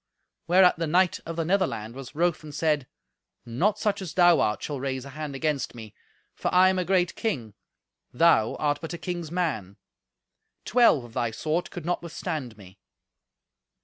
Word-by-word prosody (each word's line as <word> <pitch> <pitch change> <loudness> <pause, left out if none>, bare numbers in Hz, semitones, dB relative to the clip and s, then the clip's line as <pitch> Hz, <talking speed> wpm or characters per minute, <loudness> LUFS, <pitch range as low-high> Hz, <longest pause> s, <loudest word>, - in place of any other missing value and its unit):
Whereat 180 0 +5
the 165 - -1
knight 180 +3 +2
of 165 - -4
the 165 -1 -1
Netherland 170 - 0
was 135 +1 -10
wroth 170 0 0
and 150 -1 -9
said, 150 -5 0 0.6
"Not 165 - 0
such 205 -2 -1
as 180 -5 -7
thou 175 -1 +6
art 105 - 0
shall 145 -3 -4
raise 130 -1 -3
a - - -9
hand 150 -1 -6
against 145 -3 -2
me, 110 -3 -10 0.4
for - - -3
I 185 +1 +6
am 185 0 0
a - - +1
great 180 -1 +2
king; 125 - -3 0.6
thou 120 -6 +3
art 145 -1 -1
but 165 0 -6
a - - -4
king's 175 -3 -5
man. 115 - -2 0.9
Twelve 230 - +4
of 120 -1 -13
thy 120 -1 0
sort 155 +9 -2
could 175 - -8
not 175 0 -1
withstand 155 - -5
me." 95 -1 -15
155 Hz, 180 wpm, -26 LUFS, 130-180 Hz, 0.9 s, thou